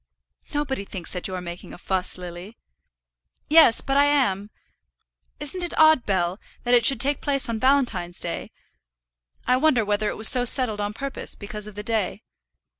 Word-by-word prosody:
"Nobody 280 -7 -3
thinks 190 -3 -6
that 180 - -2
you 185 - -6
are 180 - -5
making 175 0 -9
a - - -10
fuss, 185 0 0
Lily." 180 +4 -10 0.9
"Yes, 310 -7 +6
but 270 0 -1
I 285 - +5
am. 210 -9 0 0.9
Isn't 325 +5 -2
it 345 - -4
odd, 315 -5 +4
Bell, 185 -1 -1 0.2
that 245 - 0
it 240 -2 +4
should 270 -4 +5
take 285 +4 +1
place 280 -1 +1
on 230 -1 -3
Valentine's 250 -10 0
day? 170 - -5 1.0
I 250 - +2
wonder 260 -6 +2
whether 210 +1 -1
it - - -6
was 220 - +4
so 250 - +5
settled 240 -4 +3
on 205 0 -3
purpose, 275 +1 -5
because 210 0 -6
of 210 - -12
the 210 - -7
day. 220 -3 -3
225 Hz, 180 wpm, -23 LUFS, 195-275 Hz, 1.0 s, Yes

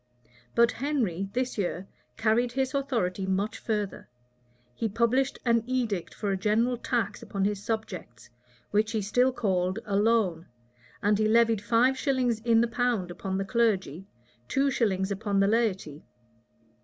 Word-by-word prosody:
But 235 0 +5
Henry, 230 - -1
this 250 -2 -2
year, 185 0 -2 0.3
carried 230 +2 +2
his 265 0 -1
authority 225 -9 -1
much 195 +3 -1
further. 210 - -3 0.6
He 225 - -2
published 240 +5 +1
an 230 -2 +3
edict 235 -8 -2
for 205 -2 -2
a 195 - 0
general 220 +5 +1
tax 225 -4 -2
upon 195 -1 -2
his 205 -1 -1
subjects, 185 - -5 0.4
which 215 +2 +1
he 220 - 0
still 250 +6 +2
called 185 -5 0
a 200 - -2
loan; 205 -6 +2 0.6
and 205 0 +3
he 215 - +3
levied 225 -1 +3
five 245 +4 +2
shillings 255 -5 +1
in 230 0 +3
the 235 - +2
pound 230 -6 -1
upon 190 +2 -4
the 195 - -2
clergy, 195 - 0 0.4
two 275 +1 +1
shillings 195 -5 0
upon 200 0 -1
the 195 - +4
laity. 195 -9 0
220 Hz, 150 wpm, -28 LUFS, 195-240 Hz, 0.6 s, But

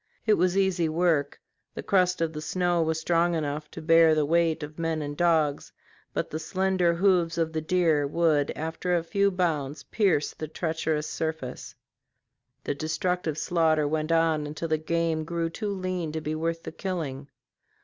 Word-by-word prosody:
It 215 - +4
was 180 -1 +2
easy 185 -4 +2
work; 160 -3 +1 0.4
the - - -5
crust 180 -3 +2
of 165 -1 0
the 150 - -5
snow 175 +1 0
was 160 0 0
strong 170 +1 +2
enough 150 -1 -3
to 160 - -9
bear 165 -1 +6
the 155 -1 +2
weight 165 0 +1
of 150 +2 -8
men 165 -1 -1
and 145 -1 -4
dogs, 160 -3 +1 0.4
but - - -3
the 155 - -3
slender 185 +1 +1
hoofs 175 -2 +2
of 165 -1 0
the 160 - -1
deer 160 -3 +2
would 150 -2 +2
after 165 +3 -1
a 165 - -2
few 200 +4 +2
bounds 155 -6 -1
pierce 190 -9 +1
the 155 - -6
treacherous 160 -1 -2
surface. 160 -7 -5 0.9
This 145 - -3
destructive 165 0 -1
slaughter 160 -2 +2
went 155 +1 -1
on 165 -2 +2
until 155 +2 -5
the 155 0 +1
game 165 0 0
grew 165 0 -2
too 210 +4 -4
lean 185 -4 -3
to 160 - -3
be 155 0 -3
worth 165 +1 -2
the - - -6
killing. 160 -7 -4
165 Hz, 175 wpm, -27 LUFS, 155-175 Hz, 0.9 s, bear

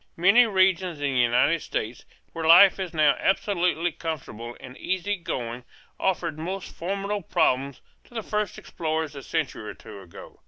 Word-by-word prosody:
Many 200 +8 +6
regions 185 -4 +2
in 145 -1 -1
the 130 - +1
United 125 +7 +3
States 115 +3 -4 0.3
where 165 -1 -3
life 185 +4 +8
is 185 -2 -3
now 155 -3 +3
absolutely 180 -3 +1
comfortable 120 -8 -6
and 130 -1 -11
easygoing 170 - -3 0.4
offered 170 -5 -1
most 185 +4 -5
formidable 200 +3 -3
problems 140 -6 0 0.2
to 240 - -19
the 225 - -3
first 210 -1 -2
explorers 160 -2 -3
a 140 - -7
century 135 -9 -3
or - - -8
two 100 -2 -11
ago. 90 -3 -13
165 Hz, 155 wpm, -25 LUFS, 140-190 Hz, 0.4 s, life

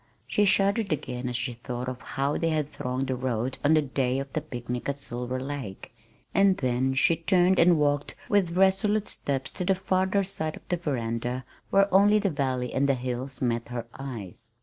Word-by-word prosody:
She 210 - +2
shuddered 200 +1 +2
again 125 -4 -2
as 125 - -4
she 120 +1 -2
thought 120 +1 -5
of 130 -1 -5
how 140 +2 -1
they 165 - +1
had 155 -2 -1
thronged 125 +1 -2
the 130 - +1
road 125 0 -2
on 150 +2 +5
the 155 - +3
day 130 -2 0
of 135 0 -5
the 155 - -1
picnic 125 -3 -5
at 140 - -2
Silver 125 -1 -3
Lake 135 -7 -6 0.4
and 195 -1 +4
then 130 0 0
she 165 +5 +4
turned 180 +2 +3
and 170 0 +6
walked 145 -1 0
with 185 -4 +2
resolute 195 +2 +3
steps 135 -2 -3
to 185 - -4
the 190 +1 +2
farther 190 +1 +1
side 160 -5 -2
of - - -14
the 175 - +1
veranda 125 -4 -2 0.2
where 195 0 +4
only 205 +2 +6
the 200 -2 +1
valley 130 -4 -1
and 140 +1 +2
the 135 - +4
hills 130 +1 -4
met 120 -1 0
her 120 -1 -5
eyes. 115 -9 -7
140 Hz, 195 wpm, -27 LUFS, 125-180 Hz, 0.4 s, and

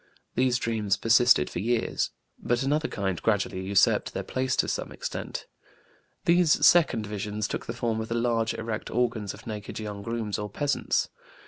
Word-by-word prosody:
These 125 -1 +2
dreams 110 -4 0
persisted 115 - +5
for - - -5
years. 115 +4 0 0.3
But 120 +2 0
another 150 +3 +1
kind 95 -3 -2
gradually 100 -3 0
usurped 95 +1 +2
their - - -2
place 130 0 -1
to - - +2
some - - -3
extent. - - -5 0.8
These 170 -2 +4
second 155 -11 +5
visions 105 +1 -3
took - - -5
the 115 - -3
form 115 -2 -1
of 110 - -5
the 115 - -2
large, 115 -1 +1
erect 110 -1 -4
organs 115 -4 -1
of - - -15
naked 105 -2 -6
young 105 -2 -5
grooms 110 -1 -3
or 105 0 -4
peasants. 145 +7 0
115 Hz, 165 wpm, -27 LUFS, 105-120 Hz, 0.8 s, persisted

